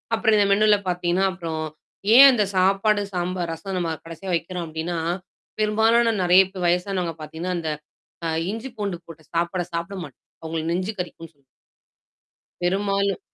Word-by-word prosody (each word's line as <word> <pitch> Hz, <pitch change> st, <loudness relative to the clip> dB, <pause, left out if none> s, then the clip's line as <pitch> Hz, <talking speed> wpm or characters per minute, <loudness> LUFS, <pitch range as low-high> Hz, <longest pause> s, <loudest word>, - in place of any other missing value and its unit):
அப்புறம் 220 Hz, -1 st, +3 dB
இந்த 205 Hz, -, +4 dB
மெனுல 210 Hz, +1 st, +5 dB
பார்த்தீங்கன்னா, 180 Hz, +1 st, +1 dB
அப்புறம் 165 Hz, -3 st, -4 dB, 0.5 s
ஏன் 275 Hz, +1 st, +11 dB
அந்த 220 Hz, -5 st, +2 dB
சாப்பாடு, 195 Hz, +3 st, +3 dB
சாம்பார், 180 Hz, -1 st, -2 dB
ரசம் 190 Hz, +3 st, -5 dB
நம்ம 165 Hz, -2 st, -1 dB
கடைசியா 175 Hz, +3 st, -6 dB
வைக்கிறோம் 170 Hz, +1 st, -3 dB
அப்டின்னா, 160 Hz, +2 st, -3 dB, 0.6 s
பெரும்பாலான 225 Hz, +2 st, +3 dB
நெறைய 180 Hz, +2 st, +7 dB
பே 190 Hz, -, -7 dB
வயசானவங்க 180 Hz, -1 st, 0 dB
பார்த்தீங்கன்னா, 160 Hz, +4 st, -4 dB
அந்த 160 Hz, -2 st, -3 dB, 0.6 s
அ -, -, 0 dB, 0.2 s
இஞ்சி 230 Hz, +4 st, -6 dB
பூண்டு 200 Hz, -4 st, -2 dB
போட்டு 160 Hz, -1 st, -13 dB
சாப்பாட 170 Hz, +2 st, 0 dB
சாப்பிட 170 Hz, +4 st, -3 dB
மாட்டாங்க. 135 Hz, -4 st, -14 dB, 0.2 s
அவங்களுக்கு 160 Hz, +1 st, -2 dB
நெஞ்ச 185 Hz, +2 st, -2 dB
கறிக்கும்ன்னு 165 Hz, -2 st, -7 dB
சொல்லி 140 Hz, -1 st, -35 dB, 1.2 s
பெரும்பாலும். 195 Hz, +1 st, 0 dB
180 Hz, 145 wpm, -23 LUFS, 165-200 Hz, 1.2 s, ஏன்